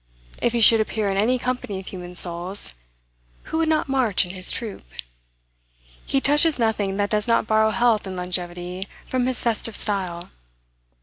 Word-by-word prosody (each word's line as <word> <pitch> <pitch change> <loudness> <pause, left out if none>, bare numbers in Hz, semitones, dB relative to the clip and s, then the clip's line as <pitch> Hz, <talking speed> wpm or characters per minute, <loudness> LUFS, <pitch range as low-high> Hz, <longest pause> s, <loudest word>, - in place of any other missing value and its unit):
If 240 - +1
he 235 - +1
should 225 +1 +7
appear 215 -2 -1
in 195 - -2
any 235 +6 +2
company 250 -6 -3
of 190 - -10
human 180 -2 -8
souls, 175 - +1 0.7
who 320 - -3
would 325 -1 +1
not 310 -2 +1
march 255 -9 +2
in 180 - -8
his 185 -1 +3
troop? 225 -5 -5 1.2
He 270 - +2
touches 295 +3 +3
nothing 215 -4 0
that 205 0 -1
does 210 0 0
not 230 -1 +2
borrow 220 0 +3
health 220 -2 +1
and 190 - -6
longevity 180 +1 -4 0.2
from 255 -1 -1
his 255 -1 -1
festive 230 -1 -1
style. 180 -4 -2
210 Hz, 170 wpm, -23 LUFS, 185-240 Hz, 1.2 s, should